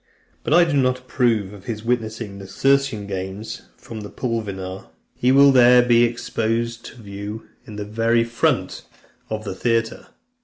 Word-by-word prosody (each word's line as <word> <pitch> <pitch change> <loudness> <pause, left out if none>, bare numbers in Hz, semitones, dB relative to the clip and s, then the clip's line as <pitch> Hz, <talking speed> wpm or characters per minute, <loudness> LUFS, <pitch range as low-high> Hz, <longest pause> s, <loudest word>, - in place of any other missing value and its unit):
But 155 - +2
I 175 - +7
do 165 -3 -1
not 130 -1 +2
approve 120 -6 0
of 100 -2 -13
his 110 -2 -5
witnessing 110 -4 -3
the 95 - -9
Circensian 135 -3 +1
games 95 +2 -6
from 110 -2 -9
the 105 - -8
Pulvinar. 100 -6 -4 0.3
He 125 - +1
will 140 +1 +7
be 130 - +5
there 125 0 +7 0.2
exposed 115 0 -2
to 115 - -11
view 100 +2 -7 0.2
in 105 - -9
the 105 0 -5
very 115 +2 +1
front 115 0 -1 0.5
of 110 0 -4
the 100 - -5
theatre. 115 +3 -1
115 Hz, 160 wpm, -21 LUFS, 105-125 Hz, 0.5 s, I